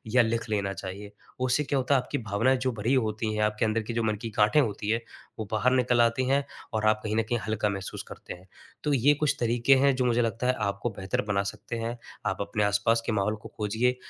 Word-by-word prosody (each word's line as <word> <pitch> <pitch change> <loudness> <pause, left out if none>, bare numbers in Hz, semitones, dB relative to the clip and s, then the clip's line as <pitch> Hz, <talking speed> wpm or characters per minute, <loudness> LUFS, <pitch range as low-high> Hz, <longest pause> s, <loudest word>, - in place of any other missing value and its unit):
या 125 - +8
लिख 115 0 -1
लेना 100 -2 0
चाहिए। 100 +3 -7 0.3
उससे 130 +3 +2
क्या 140 -1 -1
होता 135 +2 +2
है 130 - +3
आपकी - - -4
भावनाएँ 115 +4 +1
जो 130 0 0
भरी 115 +5 0
होती 110 -3 0
हैं, 105 - -1
आपके 105 +1 +1
अंदर 110 +1 +1
की 115 - -5
जो 115 - 0
मन 110 -1 +1
की 115 - -4
गाँठें 105 +7 +5
होती 105 -3 -2
हैं, 115 +2 +1 0.4
वो 110 - -2
बाहर 115 +4 +2
निकल 125 -2 +3
आती 120 +2 +2
हैं 140 +1 +3 0.3
और 110 0 0
आप 110 0 +3
कहीं 110 0 -2
न 115 - +2
कहीं 120 - +1
हल्का 110 -1 0
महसूस 95 -1 -5
करते - - -9
हैं। 90 +2 -15 0.4
तो 150 - +1
ये 135 +3 +5
कुछ 145 0 +1
तरीके 120 +3 +4
हैं 135 0 +4
जो 130 -1 0
मुझे 120 0 +3
लगता 115 +2 -1
है 125 - +4
आपको 100 +4 -2
बेहतर 95 0 -1
बना 100 -1 +1
सकते 115 - -7
हैं। 115 +1 -3 0.3
आप 95 -1 -1
अपने 105 +1 -1
आस-पास 105 +3 +2
के - - 0
माहौल 105 +1 +1
को 105 - -11 0.2
खोजिए, 120 +4 +1
115 Hz, 245 wpm, -27 LUFS, 105-125 Hz, 0.4 s, या